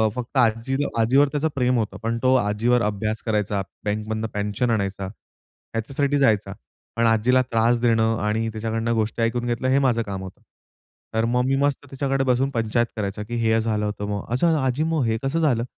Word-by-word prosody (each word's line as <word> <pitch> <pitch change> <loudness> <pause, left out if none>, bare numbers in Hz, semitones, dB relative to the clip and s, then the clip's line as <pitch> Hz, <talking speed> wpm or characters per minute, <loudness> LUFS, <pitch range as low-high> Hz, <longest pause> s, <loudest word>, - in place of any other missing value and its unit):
फक्त 125 +2 -5
आजील 125 +4 +1
आजीवर 135 +6 +4
त्याचं 150 +1 0
प्रेम 125 -1 +2
होतं. 110 -3 -2
पण 115 +1 -1
तो 130 0 +4
आजीवर 120 +1 +2
अभ्यास 105 +1 -2
करायचा, 105 -3 0 0.2
बँकमधनं 110 +1 -2
पेन्शन 105 +4 -1
आणायचा, 100 -3 -1
ह्याच्यासाठी 135 +7 -4
जायचा. 110 -7 +2 0.4
पण 115 0 +2
आजीला 115 +3 +3
त्रास 115 +1 +3
देणं 115 -1 +2
आणि 105 +2 0
त्याच्याकडनं 115 +1 -2
गोष्टी 110 +1 -1
ऐकून 120 +1 0
घेतलं 120 +1 -1
हे 135 +1 +4
माझं 125 -4 +2
काम 100 -3 -5
होतं. 95 - -10 0.7
तर 110 0 +1
मग 125 +1 +2
मी 135 +1 +2
मस्त 140 0 0
तिच्याकडे 135 0 0
बसून 130 +1 +2
पंचायत 115 -1 0
करायचा 105 -1 -3
की 120 +3 -6
"हे 115 0 +3
झालं 110 -1 -1
होतं," 105 0 -3
मग, 100 -1 -3
"असं, 165 +6 +3
आजी 130 +2 0
मग 160 -3 0
हे 110 0 +1
कसं 135 +5 0
झालं?" 130 -8 +2
115 Hz, 185 wpm, -23 LUFS, 110-130 Hz, 0.7 s, आजीवर